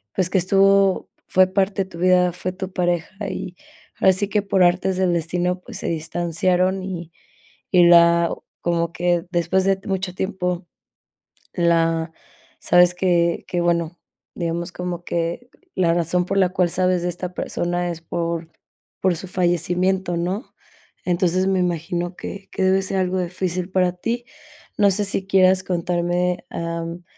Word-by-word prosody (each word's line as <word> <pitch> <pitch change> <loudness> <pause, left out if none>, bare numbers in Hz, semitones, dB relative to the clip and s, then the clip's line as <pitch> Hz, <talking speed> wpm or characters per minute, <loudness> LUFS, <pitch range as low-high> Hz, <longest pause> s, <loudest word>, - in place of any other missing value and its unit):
pues, 185 -1 +1
que 190 - +2
estuvo 195 +1 +3 0.2
fue 185 0 +4
parte 195 0 0
de - - -19
tu 170 - -10
vida, 180 -1 +3
fue 185 +1 -4
tu 190 0 -6
pareja 175 +3 -2
y 180 - -6 0.5
así 190 +1 +4
que 210 -1 +1
por 195 -2 +1
artes 185 +1 +2
del 185 -2 +2
destino, 175 +2 -1
pues, - - -9
se - - -4
distanciaron 175 +3 0
y 170 -3 -6 0.6
y 180 -2 +6
la 170 0 +6 0.4
como 170 -1 0
que 175 0 0
después 175 +2 +1
de 195 0 +3
mucho 190 -2 -2
tiempo 180 -3 -2 0.9
la 165 -1 +1 0.5
sabes 175 0 +4
que 170 -2 +1
que 175 - -2
bueno, 170 0 0 0.4
digamos 170 0 -3
como 180 -1 -5
que, 170 +8 -3 0.3
la 170 -3 +2
razón 175 +1 +1
por 195 +2 -2
la 190 - +4
cual, 180 -2 +1
sabes 180 -1 +1
de 180 - 0
esta 180 +1 -5
persona 175 0 -2
es 165 - -7
por 165 -1 -3 0.5
por 185 -2 +2
su 190 - -7
fallecimiento, 180 +1 0
¿no?, 185 +8 -3 0.5
entonces, 180 +1 +1
me 190 -1 +2
imagino 175 0 -2
que 195 0 -8
que 190 - -2
debe 190 +1 +3
ser 190 0 -2
algo 185 0 0
difícil 180 0 -3
para 180 -1 +2
ti. 235 +7 -3 0.5
No 200 -2 +4
sé, 205 +2 +1
si 195 -1 -1
quieras 185 -1 +4
contarme, 175 0 -1
am, 170 +1 -5
180 Hz, 155 wpm, -22 LUFS, 170-190 Hz, 0.9 s, y